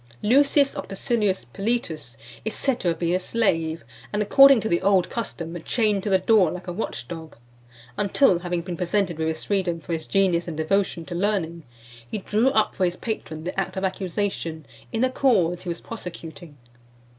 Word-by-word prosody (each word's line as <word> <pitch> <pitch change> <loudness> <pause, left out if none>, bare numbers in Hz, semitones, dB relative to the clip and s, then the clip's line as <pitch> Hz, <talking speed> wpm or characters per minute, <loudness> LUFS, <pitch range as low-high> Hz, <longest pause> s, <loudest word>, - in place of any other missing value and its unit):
III. 210 - 0
LUCIUS 280 0 +4
OCTACILIUS 195 - -1
PILITUS 160 - -3 0.3
is 220 - -3
said 265 -3 0
to - - -2
have 170 - +1
been 170 0 0
a - - +1
slave, 165 - 0 0.3
and, 210 0 0
according 275 +4 +7
to 220 - -2
the 170 -4 +1
old 190 -2 +3
custom, 175 -7 -4
chained 210 -4 +1
to 205 - -3
the 190 - +5
door 190 -2 +4
like 180 +2 -6
a 175 - -3
watch 150 - -4
dog; 160 -1 -8 0.6
until, 200 -1 +3
having 175 -1 -2
been 175 0 -5
presented 180 -1 -1
with 160 - 0
his 160 0 -2
freedom 185 -4 0
for 165 +1 -5
his 160 -1 -4
genius 185 -4 +2
and 160 -3 -5
devotion 170 +1 0
to 175 - -7
learning, 175 -3 -1 0.5
he - - -3
drew 215 +5 +2
up 220 -5 +2
for 185 - +1
his 175 0 -1
patron 160 -8 -5
the 180 +3 -3
act 195 - -3
of 190 - -2
accusation 185 -4 -2 0.3
in 225 +1 0
a 255 - +2
cause 185 -11 +2
he 180 - -6
was 170 - -4
prosecuting. 165 -7 -9
185 Hz, 190 wpm, -24 LUFS, 170-210 Hz, 0.6 s, according